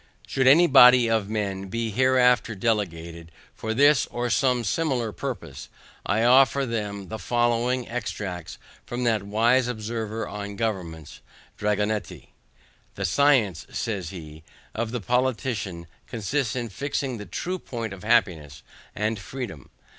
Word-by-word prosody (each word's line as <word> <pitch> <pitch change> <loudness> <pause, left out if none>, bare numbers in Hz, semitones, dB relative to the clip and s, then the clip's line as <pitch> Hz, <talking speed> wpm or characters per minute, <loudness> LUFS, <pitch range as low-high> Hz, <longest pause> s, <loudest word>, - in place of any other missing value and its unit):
Should 130 -1 0
any 160 +6 +7
body 125 -5 +7
of 110 -3 0
men 100 -3 -3
be 115 +3 -3
hereafter 125 -1 +3
delegated 85 -6 -2 0.2
for 110 - -5
this 140 +2 +4
or 120 0 -3
some 125 -1 +2
similar 125 -1 -1
purpose, 130 -3 -6 0.4
I 105 +3 +1
offer 135 +3 +5
them 105 -4 -4
the 110 - -5
following 120 +3 0
extracts 105 -7 -5 0.3
from 120 +1 -4
that 115 -3 +2
wise 115 +5 +2
observer 110 -1 -4
on 100 -1 -6
governments 90 -9 -4 0.4
DRAGONETTI. 105 0 -2 0.7
"The 100 - -3
science" 115 - +2
says 100 -7 -3
he 80 -4 -10 0.3
"of 115 0 -2
the 120 0 -4
politician 120 -7 -1 0.2
consists 120 +2 -2
in 120 -2 -3
fixing 135 +1 -3
the 105 - -8
true 180 - -4
point 115 - -5
of 100 - -11
happiness 90 -11 +1 0.3
and 105 0 -1
freedom. 100 - -7
115 Hz, 130 wpm, -25 LUFS, 100-125 Hz, 0.7 s, any